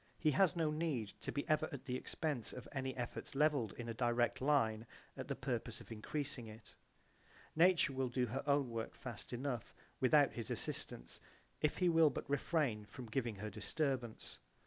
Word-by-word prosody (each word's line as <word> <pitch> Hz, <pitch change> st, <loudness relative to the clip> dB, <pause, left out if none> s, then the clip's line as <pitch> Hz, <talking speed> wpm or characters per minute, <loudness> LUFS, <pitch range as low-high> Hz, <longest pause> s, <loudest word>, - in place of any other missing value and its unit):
He 155 Hz, -, +3 dB
has 180 Hz, +5 st, +4 dB
no 160 Hz, -3 st, +1 dB
need 150 Hz, -9 st, -1 dB
to -, -, -2 dB
be 145 Hz, -, -2 dB
ever 155 Hz, 0 st, +2 dB
at 140 Hz, -2 st, -7 dB
the 125 Hz, -3 st, -2 dB
expense 140 Hz, -2 st, -2 dB
of 125 Hz, -, -8 dB
any 130 Hz, -2 st, -3 dB
efforts 120 Hz, +2 st, -4 dB
levelled 145 Hz, -7 st, +3 dB
in 120 Hz, -, -6 dB
a 115 Hz, -, -2 dB
direct 120 Hz, +1 st, +1 dB
line 115 Hz, -6 st, +2 dB, 0.3 s
at -, -, -5 dB
the -, -, -2 dB
purpose -, -, -3 dB
of -, -, -13 dB
increasing 130 Hz, +2 st, -3 dB
it. 110 Hz, +1 st, -12 dB, 0.8 s
Nature 170 Hz, -4 st, +5 dB
will 130 Hz, -1 st, 0 dB
do 125 Hz, +1 st, +1 dB
her 120 Hz, +3 st, -2 dB
own 140 Hz, -3 st, +3 dB
work 115 Hz, -1 st, -3 dB
fast 120 Hz, -5 st, -7 dB
enough 125 Hz, -1 st, -3 dB, 0.2 s
without -, -, +5 dB
his -, -, -5 dB
assistance -, -, -2 dB, 0.4 s
if 150 Hz, -, +2 dB
he 180 Hz, -, +3 dB
will 165 Hz, -2 st, +6 dB
but -, -, -5 dB
refrain 140 Hz, -6 st, +1 dB
from 125 Hz, +4 st, -9 dB
giving 120 Hz, -3 st, 0 dB
her 105 Hz, +2 st, -5 dB
disturbance. 125 Hz, +2 st, -2 dB
130 Hz, 180 wpm, -38 LUFS, 115-150 Hz, 0.8 s, will